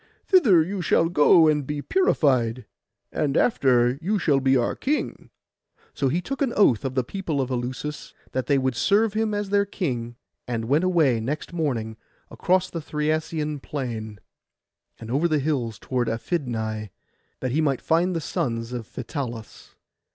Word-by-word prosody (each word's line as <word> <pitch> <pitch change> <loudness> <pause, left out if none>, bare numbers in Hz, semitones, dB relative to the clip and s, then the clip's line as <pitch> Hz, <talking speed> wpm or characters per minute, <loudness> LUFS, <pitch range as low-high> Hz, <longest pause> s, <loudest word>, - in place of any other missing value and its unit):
Thither 225 - +5
you 190 +3 -4
shall 165 0 +2
go 160 0 +6
and 150 -1 +2
be 150 0 -3
purified, 130 - +1 0.5
and 145 -2 0
after 125 - +3
you 205 +5 0
shall 150 -7 +2
be 135 0 +3
our 120 - 0
king.' 295 +3 -2 0.6
So 140 - 0
he 170 +7 0
took 275 +8 -5
an 260 -4 +1
oath 130 - +3
of 130 -1 -3
the 130 - +2
people 165 0 -3
of 130 -1 -1
Eleusis, 130 +4 -4 0.2
that 130 0 -2
they 140 - +3
would 130 -2 0
serve 205 - +2
him 215 -1 0
as 205 -1 -3
their 200 0 +4
king, 125 - -3 0.3
and 115 -2 -2
went 145 +8 +2
away 160 -10 +3
next 145 +9 -4
morning 120 -10 -2 0.3
across 185 0 +1
the 165 - -4
Thriasian 150 0 -2
plain, 115 -8 -5 0.8
and 115 0 -8
over 145 +6 +2
the 155 -2 +1
hills 135 -7 -1
toward 125 -2 -2
Aphidnai, 115 - -3 0.5
that 130 - -2
he 155 +5 +1
might 140 -4 +1
find 170 +3 +1
the 165 - -1
sons 115 -4 -3
of 120 -3 -5
Phytalus. 120 -3 -7
145 Hz, 165 wpm, -24 LUFS, 120-170 Hz, 0.8 s, go